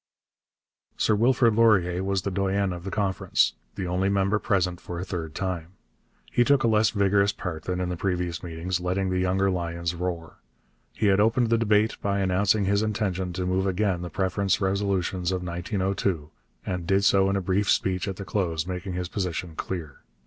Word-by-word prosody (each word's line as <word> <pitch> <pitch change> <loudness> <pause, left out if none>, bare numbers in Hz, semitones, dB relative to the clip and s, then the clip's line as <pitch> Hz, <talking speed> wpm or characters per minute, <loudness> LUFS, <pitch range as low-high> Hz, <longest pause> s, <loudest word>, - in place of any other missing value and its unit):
Sir - - +2
Wilfrid 120 +1 +3
Laurier 95 -5 +3
was 95 -1 -1
the 100 - -2
doyen 95 0 0
of 90 +1 -8
the - - -3
Conference, 95 -2 +1 0.2
the 95 - -3
only 90 +2 0
member 100 +1 +1
present 90 -4 0
for 90 - -6
a 90 - -4
third 80 -5 -5
time. 90 -2 -3 0.6
He 120 - +4
took 140 +1 +3
a - - +3
less 110 -2 +4
vigorous 100 0 +2
part 80 -5 -6
than 90 0 -2
in 90 -1 -1
the 90 - -2
previous 90 -2 -2
meetings, 85 +1 -3
letting 95 +1 -1
the 90 - 0
younger 95 +1 +1
lions 85 -1 -2
roar. 85 -2 -5 0.6
He 110 - -1
had 100 -1 +4
opened 115 +2 +3
the 115 - +5
debate 110 -1 +2
by 100 0 0
announcing 100 +2 +2
his 100 +1 +2
intention 100 -4 -1
to 90 +1 -3
move 95 +1 0
again 95 -1 0
the 90 - -5
preference 95 +3 0
resolutions 95 -2 0
of 90 -1 -2
1902, 90 -2 -2 0.3
and 90 -2 -3
did 95 0 +3
so 95 -1 +4
in 100 - +1
a - - +1
brief 95 +2 0
speech 95 0 +1
at 95 - -3
the 100 - -7
close, 85 -3 -1
making 90 0 -4
his 90 0 -3
position 90 -3 -3
clear. 80 -7 -5
95 Hz, 190 wpm, -26 LUFS, 90-100 Hz, 0.6 s, the